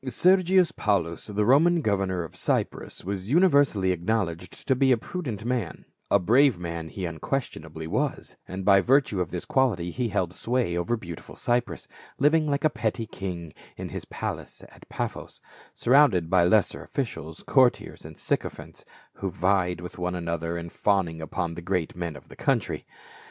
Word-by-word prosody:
273 135 Hz, +8 st, +3 dB, 0.2 s
Sergius 180 Hz, -3 st, +5 dB
Paulus, 90 Hz, -, -1 dB
the 105 Hz, 0 st, 0 dB
Roman 165 Hz, +8 st, +5 dB
governor 95 Hz, -4 st, 0 dB
of 85 Hz, -, -10 dB
Cyprus, -, -, -2 dB
was 95 Hz, +1 st, -4 dB
universally 140 Hz, -, +4 dB
acknowledged 90 Hz, -1 st, -2 dB
to 130 Hz, -, +4 dB
be 130 Hz, +1 st, +3 dB
a 125 Hz, -, +5 dB
prudent 115 Hz, -, -5 dB
man; 120 Hz, -8 st, -2 dB, 0.2 s
a -, -, +5 dB
brave 120 Hz, +6 st, +4 dB
man 85 Hz, -2 st, -5 dB
he 95 Hz, +1 st, -5 dB
unquestionably 80 Hz, -, -4 dB
was, 80 Hz, -, -2 dB
and 95 Hz, +1 st, -5 dB
by 95 Hz, -1 st, +6 dB
virtue 125 Hz, -5 st, +3 dB
of 85 Hz, -, -2 dB
this 90 Hz, -, -5 dB
quality 110 Hz, -10 st, +1 dB
he 125 Hz, +3 st, -1 dB
held 90 Hz, -3 st, -1 dB
sway 120 Hz, -5 st, -1 dB
over 85 Hz, +8 st, 0 dB
beautiful 85 Hz, -6 st, -9 dB
Cyprus, 120 Hz, 0 st, -1 dB, 0.3 s
living 155 Hz, +3 st, +3 dB
like 140 Hz, 0 st, 0 dB
a 155 Hz, -, +5 dB
petty 115 Hz, 0 st, -2 dB
king 90 Hz, -6 st, -6 dB, 0.2 s
in -, -, -5 dB
his -, -, -6 dB
palace -, -, -6 dB
at -, -, -18 dB
Paphos, -, -, -5 dB, 0.4 s
surrounded 115 Hz, -, +4 dB
by 90 Hz, -2 st, +5 dB
lesser 100 Hz, +2 st, +2 dB
officials, 80 Hz, -, -5 dB
courtiers 130 Hz, -3 st, +2 dB
and -, -, -11 dB
sycophants -, -, -3 dB, 0.3 s
who 95 Hz, -, -2 dB
vied 90 Hz, 0 st, +1 dB
with 90 Hz, +1 st, -8 dB
one 90 Hz, 0 st, -1 dB
another 85 Hz, -1 st, -3 dB
in 85 Hz, 0 st, -6 dB
fawning 90 Hz, -6 st, 0 dB
upon 85 Hz, +1 st, -3 dB
the 85 Hz, -, -7 dB
great 90 Hz, -2 st, -2 dB
men 85 Hz, -3 st, -4 dB
of -, -, -13 dB
the -, -, -13 dB
country. -, -, -1 dB
95 Hz, 165 wpm, -26 LUFS, 85-125 Hz, 0.4 s, by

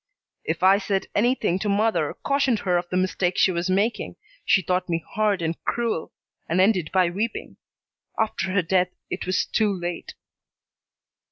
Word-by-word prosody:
"If -, -, -3 dB
I 195 Hz, +2 st, +6 dB
said 195 Hz, -1 st, -1 dB
anything 215 Hz, -5 st, +1 dB
to 210 Hz, -, -2 dB
mother, 215 Hz, +3 st, +1 dB
cautioned 275 Hz, -4 st, +2 dB
her 180 Hz, -2 st, +1 dB
of 175 Hz, 0 st, -1 dB
the 185 Hz, -, -1 dB
mistake 185 Hz, -1 st, 0 dB
she 190 Hz, -, +4 dB
was 175 Hz, +1 st, -2 dB
making, 200 Hz, +5 st, 0 dB, 0.3 s
she 190 Hz, -, +3 dB
thought 180 Hz, +2 st, -1 dB
me 165 Hz, -1 st, -1 dB
hard 210 Hz, -4 st, +1 dB
and 165 Hz, 0 st, -3 dB
cruel, 230 Hz, -9 st, -2 dB, 0.4 s
and 170 Hz, +3 st, +1 dB
ended 185 Hz, -5 st, +3 dB
by 185 Hz, -2 st, +3 dB
weeping. 215 Hz, +5 st, -4 dB, 0.6 s
After 215 Hz, -4 st, -1 dB
her 190 Hz, -1 st, +2 dB
death 180 Hz, +1 st, +2 dB, 0.2 s
it -, -, -4 dB
was 185 Hz, -, +1 dB
too 215 Hz, -2 st, +1 dB
late." 175 Hz, -2 st, -5 dB
190 Hz, 165 wpm, -24 LUFS, 180-215 Hz, 0.6 s, I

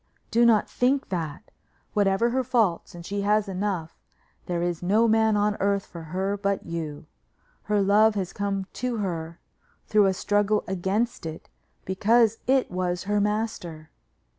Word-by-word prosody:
"Do 235 Hz, +1 st, +5 dB
not 220 Hz, -3 st, +4 dB
think 265 Hz, +2 st, 0 dB
that. 160 Hz, -5 st, -5 dB, 0.4 s
Whatever 205 Hz, +3 st, +2 dB
her 260 Hz, +1 st, +1 dB
faults, 225 Hz, -10 st, 0 dB
and 170 Hz, -1 st, -9 dB
she 200 Hz, +2 st, -3 dB
has 210 Hz, +1 st, +2 dB
enough, 185 Hz, -4 st, -3 dB, 0.5 s
there 175 Hz, -1 st, -1 dB
is 175 Hz, -2 st, -2 dB
no 210 Hz, +6 st, +3 dB
man 220 Hz, -1 st, +3 dB
on 205 Hz, 0 st, +1 dB
earth 200 Hz, 0 st, +1 dB
for 170 Hz, -, -10 dB
her 190 Hz, +5 st, -2 dB
but 200 Hz, -1 st, -1 dB
you. 160 Hz, -2 st, -5 dB, 0.6 s
Her 210 Hz, -1 st, +2 dB
love 210 Hz, +2 st, +4 dB
has 190 Hz, -2 st, -3 dB
come 200 Hz, -1 st, -2 dB, 0.2 s
to 250 Hz, -2 st, -1 dB
her 170 Hz, -5 st, -4 dB, 0.5 s
through 210 Hz, -2 st, +4 dB
a 190 Hz, -, +2 dB
struggle 205 Hz, +2 st, +1 dB
against 190 Hz, +2 st, -1 dB
it 160 Hz, 0 st, -8 dB, 0.4 s
because 225 Hz, +4 st, +3 dB
it 265 Hz, -4 st, +2 dB
was 180 Hz, -1 st, -2 dB
her 205 Hz, +1 st, +1 dB
master. 205 Hz, -7 st, -3 dB
200 Hz, 155 wpm, -25 LUFS, 180-215 Hz, 0.6 s, Do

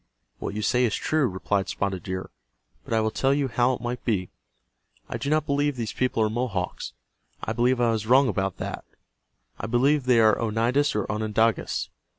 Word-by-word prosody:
"What -, -, -4 dB
you 105 Hz, -, -2 dB
say 125 Hz, +3 st, +2 dB
is 110 Hz, -, 0 dB
true," 155 Hz, -4 st, +1 dB
replied 95 Hz, 0 st, -1 dB
Spotted 95 Hz, -2 st, -2 dB
Deer. 95 Hz, +1 st, -5 dB, 0.5 s
"But -, -, -2 dB
I 110 Hz, -, +3 dB
will 110 Hz, 0 st, 0 dB
tell 135 Hz, +4 st, +2 dB
you 140 Hz, -2 st, 0 dB
how 125 Hz, +2 st, +2 dB
it 120 Hz, -, -5 dB
might 120 Hz, 0 st, -4 dB
be. 95 Hz, -6 st, -1 dB, 0.8 s
I -, -, -4 dB
do 140 Hz, -, -2 dB
not 155 Hz, 0 st, +2 dB
believe 145 Hz, 0 st, +1 dB
these 115 Hz, -3 st, -4 dB
people 125 Hz, -3 st, +1 dB
are -, -, +3 dB
Mohawks. 110 Hz, -6 st, -3 dB, 0.5 s
I 110 Hz, -, -2 dB
believe 120 Hz, +2 st, +2 dB
I 120 Hz, -1 st, +3 dB
was 110 Hz, -1 st, -2 dB
wrong 130 Hz, +3 st, +6 dB
about 95 Hz, -3 st, -1 dB
that. -, -, -5 dB, 0.8 s
I 100 Hz, -, -3 dB
believe 135 Hz, +6 st, +3 dB
that 130 Hz, -, -16 dB
they 125 Hz, -2 st, +5 dB
are 110 Hz, -1 st, +5 dB
Oneidas 115 Hz, +6 st, +1 dB
or 105 Hz, -, 0 dB
Onondagas. 110 Hz, +1 st, 0 dB
115 Hz, 195 wpm, -25 LUFS, 105-130 Hz, 0.8 s, wrong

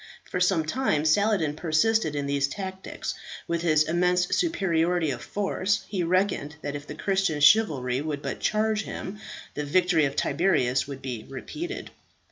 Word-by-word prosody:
For 180 Hz, -, -1 dB
some 180 Hz, -3 st, +2 dB
time 155 Hz, -, 0 dB
Saladin 170 Hz, -3 st, +2 dB
persisted 160 Hz, +2 st, +1 dB
in 145 Hz, -1 st, -1 dB
these 140 Hz, -1 st, +1 dB
tactics. 190 Hz, +3 st, -5 dB, 0.3 s
With 170 Hz, -1 st, -1 dB
his 155 Hz, -3 st, +4 dB
immense 180 Hz, +2 st, +1 dB
superiority 175 Hz, -, +1 dB
of 120 Hz, -2 st, -5 dB
force 200 Hz, 0 st, -1 dB
he 195 Hz, -3 st, -2 dB
reckoned 180 Hz, -4 st, 0 dB
that 145 Hz, 0 st, -3 dB
if 145 Hz, 0 st, -7 dB
the 150 Hz, -, -7 dB
Christian 190 Hz, -3 st, 0 dB
chivalry 145 Hz, -, +4 dB
would 150 Hz, -1 st, -4 dB
but -, -, -4 dB
charge 215 Hz, 0 st, +1 dB
him, 205 Hz, -1 st, -6 dB, 0.3 s
the 150 Hz, -, -3 dB
victory 170 Hz, +1 st, +3 dB
of 140 Hz, 0 st, -3 dB
Tiberias 135 Hz, -10 st, +1 dB
would 140 Hz, -2 st, -8 dB
be 125 Hz, -5 st, -5 dB
repeated. 315 Hz, -, -6 dB
170 Hz, 155 wpm, -26 LUFS, 145-195 Hz, 0.3 s, his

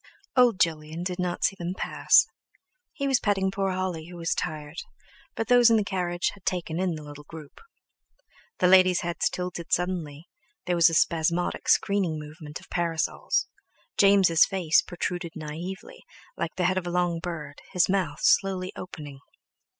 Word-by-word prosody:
Old 245 Hz, -6 st, +4 dB
Jolyon 160 Hz, 0 st, -1 dB
did 180 Hz, 0 st, -4 dB
not 180 Hz, -1 st, -2 dB
see 195 Hz, -, +2 dB
them 175 Hz, +2 st, -3 dB
pass; -, -, +4 dB, 0.7 s
he 280 Hz, -, -3 dB
was 265 Hz, -2 st, +3 dB
petting 195 Hz, -2 st, +1 dB
poor 195 Hz, 0 st, -1 dB
Holly 185 Hz, -3 st, -3 dB
who 175 Hz, 0 st, -10 dB
was 165 Hz, 0 st, -1 dB
tired, 150 Hz, +1 st, -5 dB, 0.6 s
but 225 Hz, -, -2 dB
those 245 Hz, -1 st, +6 dB
in 225 Hz, -, +5 dB
the 215 Hz, -, +1 dB
carriage 175 Hz, -3 st, -1 dB
had 200 Hz, -, -17 dB
taken 175 Hz, -2 st, -2 dB
in 185 Hz, -3 st, 0 dB
the 155 Hz, -, -8 dB
little 145 Hz, 0 st, -10 dB
group; 155 Hz, -1 st, -12 dB, 1.0 s
the -, -, +1 dB
ladies' 185 Hz, -1 st, +6 dB
heads 175 Hz, -1 st, -1 dB
tilted 180 Hz, -2 st, -5 dB
suddenly, 170 Hz, -4 st, -2 dB, 0.4 s
there 180 Hz, -, 0 dB
was 170 Hz, 0 st, +6 dB
a 165 Hz, -, -2 dB
spasmodic 170 Hz, +2 st, +1 dB
screening 195 Hz, -6 st, +2 dB
movement 150 Hz, 0 st, -9 dB
of -, -, -17 dB
parasols; 175 Hz, -, 0 dB, 0.5 s
James' 195 Hz, -5 st, +5 dB
face 180 Hz, -5 st, +2 dB
protruded 175 Hz, -1 st, -4 dB
naively, 180 Hz, -, -7 dB, 0.3 s
like -, -, -4 dB
the 180 Hz, -, 0 dB
head 185 Hz, +1 st, +2 dB
of 175 Hz, -, -8 dB
a -, -, -3 dB
long 175 Hz, -1 st, 0 dB
bird, 155 Hz, -5 st, -7 dB
his 180 Hz, -, +3 dB
mouth 190 Hz, -2 st, -1 dB
slowly 190 Hz, -1 st, +2 dB
opening. 150 Hz, -6 st, -9 dB
175 Hz, 165 wpm, -26 LUFS, 165-190 Hz, 1.0 s, those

